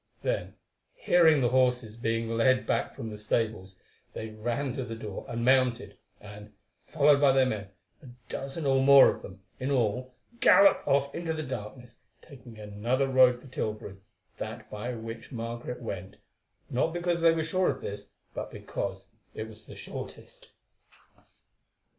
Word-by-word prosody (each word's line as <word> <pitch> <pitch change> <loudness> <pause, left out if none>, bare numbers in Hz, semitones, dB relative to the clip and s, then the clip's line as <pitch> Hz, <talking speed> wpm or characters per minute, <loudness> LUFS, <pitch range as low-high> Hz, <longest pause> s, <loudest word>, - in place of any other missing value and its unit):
Then, - - -2 0.4
hearing 165 - +4
the 120 - +3
horses 125 -3 +1
being 115 0 -1
led 115 +3 +2
back - - 0
from 110 - -6
the 105 - -8
stables, 105 -3 -2 0.4
they 110 - -6
ran 120 +5 -3
to 130 - -3
the 115 -2 -6
door 110 -3 -7
and 120 0 -2
mounted, 130 -2 +2 0.2
and, 105 +1 -12 0.3
followed 145 -2 +4
by 140 -2 +6
their 135 -1 +4
men, 110 -5 -3 0.3
a 140 - -13 0.2
dozen 140 +3 -5
or 135 -1 +3
more 140 0 +8
of - - -12
them, 95 +1 -12 0.2
in 130 - -2
all, 125 -1 0 0.2
galloped 195 0 +6
off 140 0 +2
into 165 -1 -3
the 155 0 -4
darkness, 120 -1 -8 0.2
taking 125 -6 -14
another 110 +6 -1
road 130 -2 +5
for 135 - -15
Tilbury, 105 -5 -5 0.4
that - - -7
by 115 +4 -4
which 115 0 -8
Margaret 120 +1 -5
went, 95 -4 -6 0.5
not 145 +6 0
because 175 -1 -1
they 165 0 +6
were 160 -1 -1
sure 185 +3 +1
of - - -3
this, 100 0 -7 0.2
but - - -5
because - - -5 0.3
it 110 - -5
was 110 0 -13
the - - -10
shortest. - - -9
125 Hz, 160 wpm, -28 LUFS, 110-135 Hz, 0.5 s, more